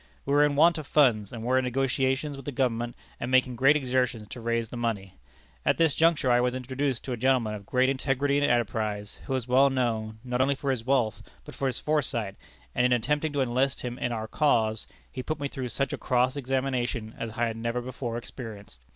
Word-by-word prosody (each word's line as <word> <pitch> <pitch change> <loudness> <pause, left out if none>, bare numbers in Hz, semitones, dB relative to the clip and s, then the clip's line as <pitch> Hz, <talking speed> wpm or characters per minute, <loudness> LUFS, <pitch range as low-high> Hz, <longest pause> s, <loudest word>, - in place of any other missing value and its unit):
We 140 - 0
were 145 +1 +6
in 145 -1 +2
want 165 +3 +5
of 150 - -8
funds, 120 -10 +3
and 115 -2 -7
were 130 +2 +3
in - - -1
negotiations 135 +2 0
with 135 -1 -10
the - - -1
government, 120 -3 -1 0.2
and 120 - -3
making 130 -1 +3
great 135 +5 +5
exertions 125 -5 0
to 120 - -8
raise 115 -1 -1
the - - -8
money. 105 -6 -3 0.4
At - - +2
this 165 -3 +3
juncture 160 -5 +3
I 120 0 +4
was 125 0 0
introduced 130 0 -2
to 130 - -5
a 120 - -2
gentleman 125 -3 +2
of 100 -1 -8
great 130 +1 +3
integrity 135 +1 +1
and 145 0 +2
enterprise, 110 -3 -1
who 135 - 0
is 130 -2 -3
well 135 +2 +5
known, 115 -4 -1
not 125 0 -1
only 140 +1 +2
for 135 0 -1
his 125 -4 -2
wealth, 125 -4 +1 0.2
but - - -10
for 135 - -2
his 125 - -2
foresight, 120 -9 -1 0.4
and 120 - +1
in 125 0 +4
attempting 150 +6 0
to 140 - +1
enlist 130 +2 0
him 125 0 -5
in 120 - -1
our 110 -2 -3
cause 110 -6 +1 0.2
he 130 - -5
put 155 +4 -3
me 140 - -1
through 130 -2 -5
such 135 +2 -1
a - - -4
cross 125 +1 +1
examination 130 -4 -2
as 115 - -3
I 120 - +2
had 115 -1 -2
never 115 +1 -2
before 120 -1 -4
experienced. 110 - -9
125 Hz, 225 wpm, -27 LUFS, 115-135 Hz, 0.4 s, were